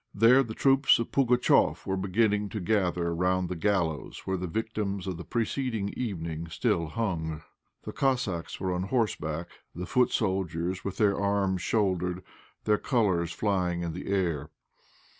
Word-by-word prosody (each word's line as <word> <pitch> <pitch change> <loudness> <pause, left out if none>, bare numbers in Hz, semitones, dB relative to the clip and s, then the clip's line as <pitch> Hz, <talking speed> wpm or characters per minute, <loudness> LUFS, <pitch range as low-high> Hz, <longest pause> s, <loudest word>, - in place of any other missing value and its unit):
There 115 +6 +6
the 115 -4 -4
troops 135 0 +4
of 115 - -3
Pugatchéf 125 -2 +3
were 95 - -1
beginning 105 +2 +1
to 105 - -4
gather 90 -4 0
round 90 +1 +1
the 90 - -3
gallows 85 -5 -1
where 95 - -1
the 90 0 -3
victims 105 -1 -3
of 95 -3 -3
the 85 - -7
preceding 115 -2 -1
evening 85 -8 -4
still 85 0 0
hung. 80 -5 -3 0.4
The - - -5
Cossacks 125 -11 -1
were 95 -1 -1
on 90 - -1
horseback, 85 - -1 0.3
the 90 +2 -4
foot 125 +2 +3
soldiers 95 -3 -1
with 100 -1 -4
their 105 -3 +2
arms 100 -2 +1
shouldered, 90 -4 0 0.4
their 105 -1 +2
colours 95 - +1
flying 90 -3 0
in 85 -1 -3
the 90 - -7
air. 85 -7 0
95 Hz, 155 wpm, -28 LUFS, 85-110 Hz, 0.4 s, There